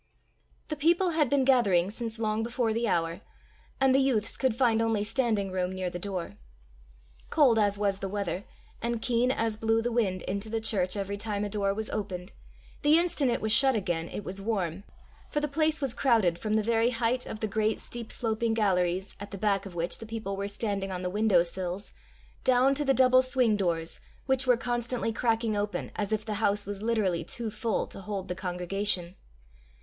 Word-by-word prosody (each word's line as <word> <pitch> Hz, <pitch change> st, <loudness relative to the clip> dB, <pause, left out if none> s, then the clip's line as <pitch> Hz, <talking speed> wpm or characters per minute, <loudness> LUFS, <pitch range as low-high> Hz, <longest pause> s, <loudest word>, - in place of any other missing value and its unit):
The 305 Hz, -, -1 dB
people 340 Hz, +5 st, +3 dB
had 310 Hz, -5 st, +2 dB
been 275 Hz, -1 st, +3 dB
gathering 200 Hz, -9 st, +4 dB
since 230 Hz, 0 st, -4 dB
long 215 Hz, -1 st, 0 dB
before 230 Hz, -1 st, 0 dB
the 230 Hz, +1 st, 0 dB
hour, 170 Hz, -1 st, 0 dB, 0.6 s
and 270 Hz, -1 st, +4 dB
the 270 Hz, -, +5 dB
youths 250 Hz, -6 st, +1 dB
could 260 Hz, -4 st, +1 dB
find 230 Hz, -3 st, +3 dB
only 225 Hz, -2 st, +1 dB
standing 215 Hz, -4 st, 0 dB
room 185 Hz, 0 st, -1 dB
near 185 Hz, -1 st, -3 dB
the 175 Hz, -, -5 dB
door. 180 Hz, -, -5 dB, 0.9 s
Cold 260 Hz, -8 st, +4 dB
as 205 Hz, -1 st, +2 dB
was 200 Hz, -1 st, 0 dB
the 195 Hz, -, -4 dB
weather, 195 Hz, -2 st, -2 dB, 0.4 s
and 235 Hz, 0 st, -1 dB
keen 240 Hz, +2 st, +1 dB
as 225 Hz, -4 st, 0 dB
blew 225 Hz, 0 st, +2 dB
the 240 Hz, +1 st, -1 dB
wind 200 Hz, -6 st, 0 dB
into 200 Hz, +3 st, -3 dB
the 225 Hz, +1 st, -1 dB
church 200 Hz, -4 st, 0 dB
every 200 Hz, 0 st, -3 dB
time 205 Hz, -1 st, -2 dB
a -, -, -3 dB
door 200 Hz, -1 st, 0 dB
was 220 Hz, 0 st, -4 dB
opened, 190 Hz, -3 st, -4 dB, 0.5 s
the 300 Hz, +2 st, +5 dB
instant 330 Hz, -6 st, +1 dB
it 235 Hz, -, 0 dB
was 220 Hz, -, 0 dB
shut 265 Hz, +2 st, +5 dB
again 175 Hz, -5 st, -1 dB
it 205 Hz, -, -5 dB
was 190 Hz, +1 st, -6 dB
warm, 195 Hz, -3 st, -2 dB, 0.4 s
for 295 Hz, -, 0 dB
the 295 Hz, -, -1 dB
place 310 Hz, +2 st, +1 dB
was 270 Hz, -4 st, -1 dB
crowded 220 Hz, -10 st, +2 dB
from 215 Hz, -1 st, -1 dB
the 220 Hz, -, +2 dB
very 230 Hz, +1 st, +2 dB
height 245 Hz, +1 st, 0 dB
of 215 Hz, -, -6 dB
the 220 Hz, -, -1 dB
great 215 Hz, +1 st, 0 dB
steep 235 Hz, -2 st, -7 dB
sloping 225 Hz, 0 st, 0 dB
galleries, 190 Hz, -3 st, +1 dB
at 205 Hz, -, -7 dB
the 200 Hz, -, -7 dB
back 200 Hz, -1 st, 0 dB
of 180 Hz, -, -11 dB
which 170 Hz, +1 st, -2 dB
the 225 Hz, -, -8 dB
people 220 Hz, -3 st, -4 dB
were 200 Hz, +1 st, -3 dB
standing 200 Hz, -2 st, -3 dB
on 185 Hz, 0 st, -4 dB
the 180 Hz, -, -2 dB
window 205 Hz, -4 st, +4 dB
sills, 180 Hz, +2 st, -4 dB, 0.5 s
down 260 Hz, +1 st, +4 dB
to 295 Hz, +2 st, +1 dB
the 270 Hz, -1 st, +2 dB
double 255 Hz, 0 st, +6 dB
swing 255 Hz, -4 st, +2 dB
doors, 170 Hz, -4 st, -1 dB, 0.3 s
which 265 Hz, -1 st, +1 dB
were 250 Hz, -2 st, +5 dB
constantly 240 Hz, -1 st, -2 dB
cracking 225 Hz, -1 st, +1 dB
open 205 Hz, 0 st, -2 dB
as 210 Hz, -1 st, -2 dB
if 215 Hz, -1 st, -1 dB
the 215 Hz, -, -2 dB
house 205 Hz, -1 st, +2 dB
was 200 Hz, 0 st, -5 dB
literally 210 Hz, -7 st, +1 dB
too 225 Hz, +6 st, -4 dB
full 220 Hz, 0 st, -1 dB
to -, -, -8 dB
hold 195 Hz, -2 st, -5 dB
the -, -, 0 dB
congregation. 180 Hz, 0 st, -2 dB
215 Hz, 205 wpm, -28 LUFS, 195-235 Hz, 0.9 s, double